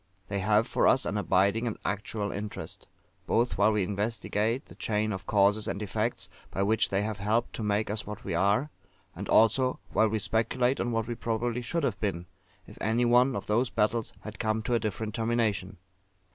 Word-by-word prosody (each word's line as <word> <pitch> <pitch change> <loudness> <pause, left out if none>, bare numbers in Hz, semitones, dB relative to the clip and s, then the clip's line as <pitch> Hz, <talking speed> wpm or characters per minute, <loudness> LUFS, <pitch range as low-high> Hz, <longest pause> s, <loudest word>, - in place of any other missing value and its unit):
They 100 -1 -1
have 105 +3 +3
for - - +2
us 130 - +4
an - - -2
abiding 100 +3 +2
and 115 - -3
actual 105 0 -2
interest, 105 +1 -6 0.4
both 120 -1 +1
while 105 +2 +5
we 105 -2 +1
investigate 110 +4 -1
the - - -13
chain 110 0 -1
of 95 +1 -7
causes 105 +1 +3
and - - -2
effects, 105 -1 -2 0.2
by 95 - -1
which 110 +2 +2
they 100 +1 +1
have 105 -1 -3
helped 110 +4 0
to - - -4
make 105 0 0
us 105 +1 -3
what 105 -1 -7
we - - -3
are; 100 - +2 0.4
and - - -6
also 125 +4 +4
while 110 - +4
we 110 - 0
speculate 125 +4 +1
on 120 - -1
what 115 -1 0
we 120 - -3
probably 115 +1 -2
should 165 +7 -2
have 110 -8 -1
been, 95 -5 -2 0.4
if - - -14
any 115 +3 +2
one 125 +2 +4
of - - -4
those 115 +4 +1
battles 110 +1 0
had 110 -1 -9
come 110 -1 0
to 120 - -1
a 120 - +3
different 110 0 -3
termination. 115 -5 0
110 Hz, 200 wpm, -29 LUFS, 105-115 Hz, 0.4 s, while